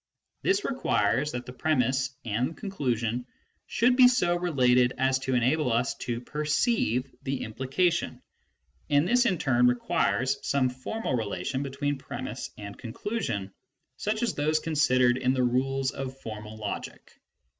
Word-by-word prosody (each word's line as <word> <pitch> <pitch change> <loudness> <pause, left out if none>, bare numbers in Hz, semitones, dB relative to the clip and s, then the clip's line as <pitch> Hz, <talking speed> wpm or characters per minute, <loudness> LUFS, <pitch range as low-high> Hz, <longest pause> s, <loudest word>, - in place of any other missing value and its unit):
This 385 +2 +1
requires 145 - +1
that 125 0 -4
premiss 130 0 0 0.2
and 120 +8 -1
conclusion 125 - -2 0.4
should 245 +1 +3
be 255 -1 +8
so 180 -9 +2
related 125 -8 +3
as 130 0 +2
to 130 -1 -1
enable 130 +3 +2
us 120 +3 +1
to 120 -1 -3
perceive 150 - 0
the 135 0 -3
implication, 135 +10 -1 0.7
and 145 +3 +3
this 245 +3 +4
in 185 - +1
turn 125 -4 +3
requires 125 +2 +1
some 135 -2 +1
formal 130 - -3
rela 110 -4 -3
tion 135 -1 -1
between 140 0 -2
premiss - - -6
and 100 -1 -8
conclusion 115 - -3 0.4
such 215 +3 -2
as 235 - +1
those 155 +2 +1
considered 130 -6 +3
m 130 +1 +2
the 130 - +2
rules 130 +2 +1
of 135 -1 -6
formal 110 -3 -8
logic. 105 -1 -6
130 Hz, 140 wpm, -28 LUFS, 125-155 Hz, 0.7 s, be